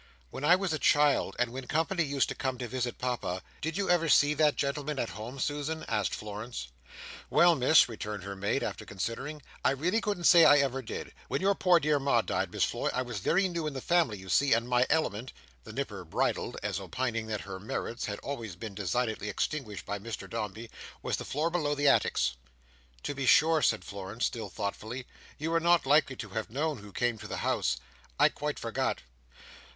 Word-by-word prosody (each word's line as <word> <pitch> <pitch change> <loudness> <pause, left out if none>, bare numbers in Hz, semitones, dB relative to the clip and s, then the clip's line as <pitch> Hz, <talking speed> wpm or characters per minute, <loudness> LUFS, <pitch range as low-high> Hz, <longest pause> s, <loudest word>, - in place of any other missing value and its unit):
"When 135 - -7
I 170 +4 +7
was 185 -3 -1
a 155 - -1
child, 145 -1 +3
and 120 -1 +1
when 130 +1 -7
company 165 +3 0
used 140 -2 +1
to - - -2
come 130 -2 -2
to 120 0 -4
visit 125 0 -3
Papa, 120 -8 -2 0.2
did 160 +3 -2
you 200 -1 0
ever 170 -2 +3
see 145 0 +5
that 150 -1 +3
gentleman 140 +1 -2
at 120 - -1
home, 115 +6 -7
Susan?" 150 +3 -2
asked 105 -4 0
Florence. 105 - -6 0.6
"Well, 175 0 +6
Miss," 150 +1 +5
returned 105 -4 -5
her 100 +1 -6
maid, 100 +2 -1
after - - -4
considering, 135 +9 -5 0.2
"I - - +5
really 170 - +1
couldn't 205 -5 -2
say 170 -1 +8
I 145 - +8
ever 135 -2 +1
did. 115 - -6
When - - -1
your 195 +1 +3
poor 180 -3 +4
dear 150 -1 +2
Ma 140 0 +3
died, - - -2
Miss - - 0
Floy, - - 0
I 130 - -1
was 120 -4 -5
very 190 - +2
new 170 -3 -3
in 150 - -3
the 135 - -4
family, 165 -7 +2
you 95 0 -11
see, 140 +9 +3
and 115 +1 +1
my 125 0 +3
element:" 130 -6 0 0.3
the - - -8
Nipper 105 -9 -4
bridled, 80 - -1
as 100 -3 -1
opining 115 +4 -2
that 105 -2 -3
her 95 -1 -7
merits 115 +3 -4
had 100 -2 -4
been - - -11
always 115 -9 -5
designedly 105 +2 -2
extinguished 110 0 -3
by 100 +1 -3
Mr 105 -2 -6
Dombey: 105 +4 -5 0.3
"was - - -1
the - - -6
floor 155 +4 -1
below 150 -4 0
the 145 0 +1
attics." 65 - +3 0.7
"To - - -2
be 135 -2 -3
sure," 160 +3 +5
said 90 - +2
Florence, 100 +3 -4
still 110 -4 -3
thoughtfully; 110 +6 -4 0.3
"you 165 +2 -2
are 165 - +4
not 170 -1 +3
likely 140 -1 +4
to - - -7
have 110 -1 -4
known 145 +3 -1
who 105 0 -12
came 120 +1 0
to - - -8
the - - -4
house. 60 - +1 0.4
I - - +6
quite - - -4
forgot." - - -2
130 Hz, 210 wpm, -30 LUFS, 105-150 Hz, 0.7 s, say